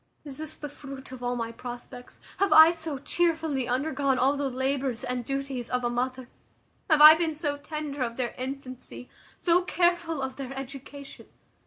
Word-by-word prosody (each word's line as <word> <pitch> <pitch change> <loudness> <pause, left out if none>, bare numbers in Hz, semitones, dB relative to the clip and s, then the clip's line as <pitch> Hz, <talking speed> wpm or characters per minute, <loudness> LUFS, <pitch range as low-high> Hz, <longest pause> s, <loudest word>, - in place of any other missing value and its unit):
Is 275 -1 -6
this 310 0 -6
the 295 - -6
fruit 275 -2 -10
of 260 -1 -9
all 245 0 -1
my 230 -1 -3
prospects? 245 +1 -9 0.2
Have 395 - +2
I 315 +1 +9
so 320 -4 -4
chearfully 320 -3 0
undergone 270 +1 0
all 265 +3 +3
the 280 -1 -1
labours 260 -1 -2
and 250 -1 -2
duties 275 -2 -4
of 250 0 -1
a 240 - 0
mother? 255 +1 -2 0.6
Have 310 -2 +5
I 305 +1 +12
been 320 -1 -1
so 295 -2 -1
tender 295 -1 -6
of 235 -2 -2
their 250 -2 -2
infancy, 255 -1 -7 0.3
so 350 0 +4
careful 345 -3 +1
of 265 0 -5
their 270 -1 -6
education? 275 +1 -9
275 Hz, 175 wpm, -27 LUFS, 255-305 Hz, 0.6 s, I